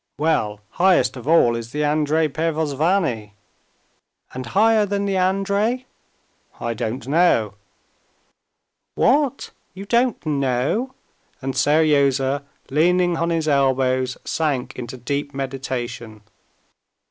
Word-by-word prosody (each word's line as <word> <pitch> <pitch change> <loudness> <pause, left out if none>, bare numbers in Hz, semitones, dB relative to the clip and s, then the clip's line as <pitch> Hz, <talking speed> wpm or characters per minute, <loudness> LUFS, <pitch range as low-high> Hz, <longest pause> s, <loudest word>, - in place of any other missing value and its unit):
"Well, 110 -10 0
highest 175 -8 +3
of 125 +1 -9
all 155 -8 +4
is 115 0 -7
the 150 0 -1
Andrey 155 +1 +1
Pervozvanny." 155 - -1 1.0
"And 130 -2 -6
higher 215 - +3
than 200 0 -1
the 195 -1 -1
Andrey?" 200 +6 0 0.7
"I 115 - -2
don't 115 +3 -4
know." 140 - +2 1.4
"What, 280 +1 +1 0.2
you 195 +1 -8
don't 235 -2 +1
know?" 140 - -1 0.4
and 135 0 -4
Seryozha, 140 -1 +2 0.3
leaning 175 +4 +2
on 170 +1 0
his 165 -2 -1
elbows, 130 -2 +1
sank 145 -6 -1
into 125 0 -7
deep 140 +3 -4
meditation. 125 -5 -5
145 Hz, 105 wpm, -21 LUFS, 130-180 Hz, 1.4 s, all